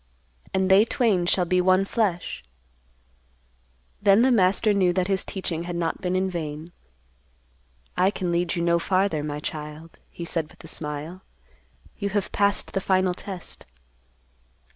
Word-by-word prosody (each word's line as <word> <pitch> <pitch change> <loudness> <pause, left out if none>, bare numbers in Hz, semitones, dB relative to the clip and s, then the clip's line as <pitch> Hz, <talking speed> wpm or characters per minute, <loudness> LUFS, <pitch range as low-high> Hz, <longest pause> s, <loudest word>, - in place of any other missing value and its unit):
"'And 190 0 +1
they 195 +2 +7
twain 220 -7 +1
shall 180 0 +2
be 180 +1 +2
one 185 +1 +3
flesh.'" 190 - -1 1.6
Then 200 +2 +5
the 260 - +4
master 205 0 +3
knew 185 -3 +3
that 185 0 0
his 195 -1 +1
teaching 170 -4 -4
had 175 0 -4
not 165 -1 -2
been 180 -1 -1
in 190 +1 +1
vain. 160 -2 -5 1.2
"I 185 +1 +3
can 185 -3 -2
lead 175 0 0
you 170 - -1
no 170 0 +3
farther, 185 -2 +1
my 150 0 -4
child," 150 +2 -7
he 170 - -7
said 165 -2 -2
with - - -17
a - - -10
smile. 150 +4 -5 0.8
"You 200 -1 -1
have 200 -1 -1
passed 200 0 +1
the 195 - 0
final 185 -1 +2
test." 185 - -8
180 Hz, 155 wpm, -25 LUFS, 170-195 Hz, 1.6 s, they